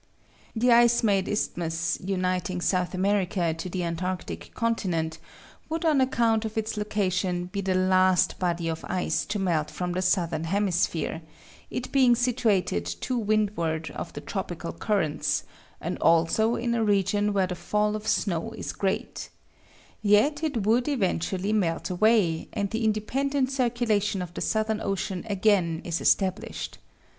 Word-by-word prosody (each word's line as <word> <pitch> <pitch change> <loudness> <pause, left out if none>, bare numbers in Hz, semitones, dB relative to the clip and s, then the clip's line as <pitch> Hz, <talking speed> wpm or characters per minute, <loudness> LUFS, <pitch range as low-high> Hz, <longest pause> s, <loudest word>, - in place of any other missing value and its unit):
The 240 +2 +3
ice 235 0 +5
made 195 -3 +2
isthmus 170 -4 -1
uniting 185 0 -1
South 180 0 0
America 185 -3 +1
to 165 +3 -6
the 180 0 -3
antarctic 170 - -4
continent 175 -9 -1 0.5
would 325 +1 -2
on 300 -4 +4
account 230 -4 +2
of 220 0 -5
its 220 +1 -1
location 190 -4 -1
be 190 +3 -4
the 190 -1 0
last 185 -1 +3
body 175 -2 -1
of 160 -1 -3
ice 185 -1 -1
to 210 - -2
melt 170 -6 0
from 180 -1 -3
the 180 +1 -1
southern 175 -4 +1
hemisphere, 175 -3 0 0.5
it 250 - -5
being 255 -3 +5
situated 225 - +1
to 255 - -3
windward 200 -8 0
of - - -6
the - - -6
tropical 85 - -5
currents 155 - 0 0.4
and - - -4
also 170 +8 +3
in 235 0 -1
a 230 -1 +1
region 205 0 +2
where 195 -2 +2
the 180 - -4
fall 210 +4 0
of 215 0 -6
snow 200 +2 0
is 225 - -5
great; 195 -1 -3 0.7
yet 220 +9 +3
it 260 -10 -1
would 235 +4 +3
eventually 195 - 0
melt 180 -5 0
away, 180 -4 +2
and 200 -1 -2
the 225 +1 -2
independent 260 +6 0
circulation 230 -7 0
of 175 -1 -9
the - - -6
Southern 220 0 0
Ocean 195 -1 -2
again 190 -5 +2
be - - -8
established. 185 +3 0
195 Hz, 150 wpm, -26 LUFS, 180-220 Hz, 0.7 s, ice